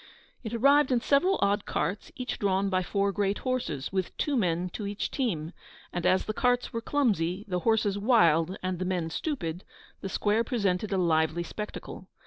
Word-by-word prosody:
It 220 - -5
arrived 275 +3 +4
in 250 - +3
several 290 +10 +3
odd 200 +1 +1
carts, 180 +8 -2
each 250 0 -4
drawn 195 0 +1
by 185 0 +2
four 200 +2 0
great 200 0 0
horses, 255 - -2
with 190 -2 -2
two 295 - 0
men 180 -5 0
to 210 - -5
each 205 0 -3
team; 175 - -2 0.4
and 175 - 0
as 185 +1 +3
the 215 - -2
carts 245 +2 +1
were 230 - -2
clumsy, 205 - 0
the 180 -2 -1
horses 210 -1 +1
wild, 185 -6 +3
and 185 -1 -2
the 185 - -2
men 175 -3 -1
stupid, 175 - -3 0.4
the 195 - -5
square 210 +4 +1
presented 205 -4 -1
a 195 - +1
lively 160 -1 +2
spectacle. 210 +4 -7
200 Hz, 180 wpm, -28 LUFS, 180-230 Hz, 0.4 s, arrived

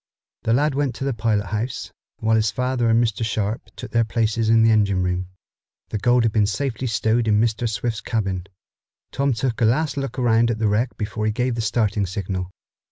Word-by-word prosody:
The 115 - +1
lad 145 +4 +2
went 140 -2 -1
to - - -5
the 135 -1 0
pilot 110 -2 0
house, 110 +4 -3 0.3
while 110 0 +1
his 110 -1 +2
father 125 +2 0
and 115 +1 +4
Mr. 115 -1 -1
Sharp 110 0 -2
took - - -8
their 115 0 +3
places 110 0 0
in 115 0 +5
the 115 - +5
engine 100 -4 +2
room. 90 0 -1 0.6
The 105 - -3
gold 120 +3 +3
had 115 - +2
been 105 -1 +2
safely 130 +2 -2
stowed 115 +1 +1
in 105 -1 +4
Mr. 115 +1 +1
Swift's 110 +1 -2
cabin. 95 -5 -2 0.6
Tom 140 0 +1
took 120 0 -2
a - - +5
last 140 +6 +1
look 135 0 -3
at 115 -2 +2
the 110 -1 +1
wreck 110 +5 0
before 110 0 -2
he - - +2
gave 125 +3 0
the 115 - -2
starting 105 -3 0
signal. 95 -1 -4
115 Hz, 205 wpm, -22 LUFS, 105-120 Hz, 0.6 s, in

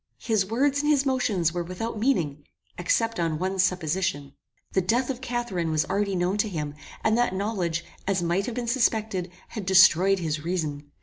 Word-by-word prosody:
His 215 -5 +1
words 275 +6 +1
and 295 - 0
his 285 -2 +3
motions 215 - +1
were 175 - -1
without 210 +6 -5
meaning, 165 - 0 0.3
except 230 - 0
on 165 -2 0
one 190 +3 -2
supposition. 165 -5 0 0.4
The 190 - +2
death 240 +8 +1
of 255 -1 -7
Catharine 240 -9 -2
was 155 -1 +1
already 200 -1 -1
known 180 +3 0
to 215 - +1
him, 150 -5 -4 0.3
and 220 - +3
that 240 -6 +1
knowledge, 185 -5 -2 0.2
as 190 -3 +1
might 175 +4 0
have 240 - -4
been 245 -1 -2
suspected, 220 -6 0 0.2
had 215 - -5
destroyed 190 0 +6
his 155 -4 -3
reason. 150 -4 -3
190 Hz, 180 wpm, -26 LUFS, 170-230 Hz, 0.4 s, destroyed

